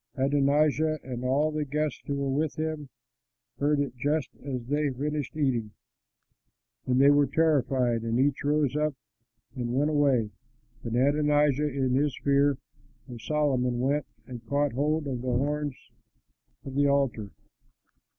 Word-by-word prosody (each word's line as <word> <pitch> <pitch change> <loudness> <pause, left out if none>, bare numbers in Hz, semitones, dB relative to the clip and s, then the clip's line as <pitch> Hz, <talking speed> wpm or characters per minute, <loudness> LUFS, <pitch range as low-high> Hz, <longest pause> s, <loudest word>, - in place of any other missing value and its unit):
Adonijah 145 +3 +2
and 125 -1 -6
all 140 +5 +1
the 155 0 -2
guests 150 +1 -2
who 140 - -1
were 140 -1 -1
with 150 +2 -1
him 155 -3 -4 0.7
heard 145 +1 +2
it 140 -3 -2
just 145 +2 -1
as 130 -4 -4
they 145 +4 0
had 135 -3 -2
finished 150 +1 -3
eating. 120 -8 0 1.1
And 125 0 +2
they 140 +1 +7
were 145 -1 +4
terrified 135 -6 +1
and 115 +1 -1
each 140 +1 +1
rose 145 -2 +1
up 150 -1 0 0.6
and 120 -1 -3
went 145 +3 +2
away. 135 -8 +2 0.5
But 115 -1 -3
Adonijah 145 +2 +2
in 130 -2 -1
his 140 0 +1
fear 140 0 +3 0.5
of 120 -3 -9
Solomon 130 -5 0
went 140 +3 0 0.2
and 120 -1 -9
caught 145 -1 0
hold 150 +4 0
of 130 -3 -3
the 130 - -6
horns 145 0 -1 0.9
of 135 - -7
the 140 +1 +2
altar. 135 -7 0
140 Hz, 150 wpm, -27 LUFS, 130-150 Hz, 1.1 s, they